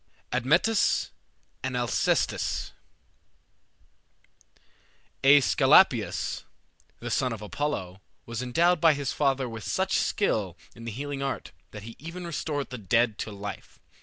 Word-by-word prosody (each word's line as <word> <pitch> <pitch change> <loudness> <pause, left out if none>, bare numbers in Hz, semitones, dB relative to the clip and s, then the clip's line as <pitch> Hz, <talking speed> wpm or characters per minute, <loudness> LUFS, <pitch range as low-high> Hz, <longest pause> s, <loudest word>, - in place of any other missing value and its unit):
ADMETUS 165 - +2 0.5
AND 130 -1 -2
ALCESTIS 120 -2 0 2.5
Aesculapius, 140 0 +4 0.6
the - - -5
son 125 - +1
of 110 -2 -6
Apollo, 105 -7 -3 0.2
was 115 0 -4
endowed 165 +7 +2
by 160 -3 +6
his 140 -2 -2
father 135 -3 +1
with 110 -2 -7
such - - -1
skill - - 0 0.2
in 115 - -11
the 115 - -4
healing 140 +4 -5
art 135 0 -3 0.2
that 105 -1 -10
he 115 +1 -9
even 170 +5 -7
restored 150 -4 -3
the 125 - -6
dead 110 +2 +1
to 110 - -4
life. 100 0 -8
130 Hz, 120 wpm, -27 LUFS, 115-145 Hz, 2.5 s, by